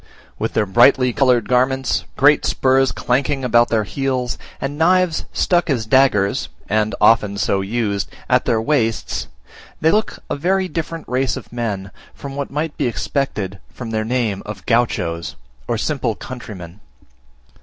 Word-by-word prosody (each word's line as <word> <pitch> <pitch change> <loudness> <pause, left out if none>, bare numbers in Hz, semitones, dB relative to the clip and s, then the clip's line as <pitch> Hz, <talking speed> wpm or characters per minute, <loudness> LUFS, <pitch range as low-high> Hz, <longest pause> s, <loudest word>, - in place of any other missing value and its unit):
With - - -2
their 105 - +2
brightly 120 +4 +4
coloured 125 -4 +3
garments, 130 +1 +1
great 145 +2 +5
spurs 130 0 +2
clanking 135 +2 0
about 120 -1 +4
their 110 -2 +1
heels, 130 +1 -2 0.2
and 135 +1 -3
knives 175 +1 +2
stuck 175 -1 +1
as 120 -6 0
daggers 110 -5 +2 0.2
(and 110 +1 0
often 105 -2 +4
so 100 -1 +1
used) 100 -1 -2 0.2
at - - +2
their 115 - +2
waists, 115 -3 -1 0.5
they 160 - +3
look 215 +1 0
a - - -2
very 185 +6 +1
different 165 -1 -5
race 130 0 0
of - - -11
men 100 -5 -3 0.2
from 140 -1 -8
what 140 -1 -3
might 150 +2 -3
be - - 0
expected 110 -6 -2
from 120 -3 -7
their 110 -1 0
name 115 -4 -1
of 105 -3 -8
Gauchos, 110 -8 0 0.3
or 120 - 0
simple 125 -2 -1
countrymen. 100 -8 -9
125 Hz, 150 wpm, -19 LUFS, 110-140 Hz, 0.5 s, great